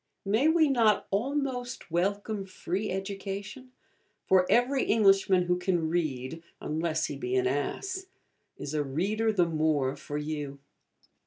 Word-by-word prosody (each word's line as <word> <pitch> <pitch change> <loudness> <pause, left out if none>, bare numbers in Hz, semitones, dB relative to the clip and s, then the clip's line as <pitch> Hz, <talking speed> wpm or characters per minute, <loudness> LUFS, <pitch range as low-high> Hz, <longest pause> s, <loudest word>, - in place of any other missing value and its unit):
May 220 +9 +3
we 320 -1 +5
not 230 -6 +3
almost 250 - -2
welcome 200 +4 -1
'Free 190 +2 -3
Education'? 200 +5 -5 0.6
for 185 -1 +4
every 255 +3 +3
Englishman 195 -4 +4
who 180 0 0
can 175 -3 0
read, 155 -3 -2 0.2
unless 160 0 -1
he 145 - -4
be 125 -2 -2
an 130 -1 +2
Ass, 375 - -2 0.5
is 145 - -6
a 150 -1 +1
reader 200 +11 0
the 185 -5 +3
more 155 -4 +1
for 145 - -6
you. 150 -2 -4
190 Hz, 135 wpm, -29 LUFS, 155-220 Hz, 0.6 s, we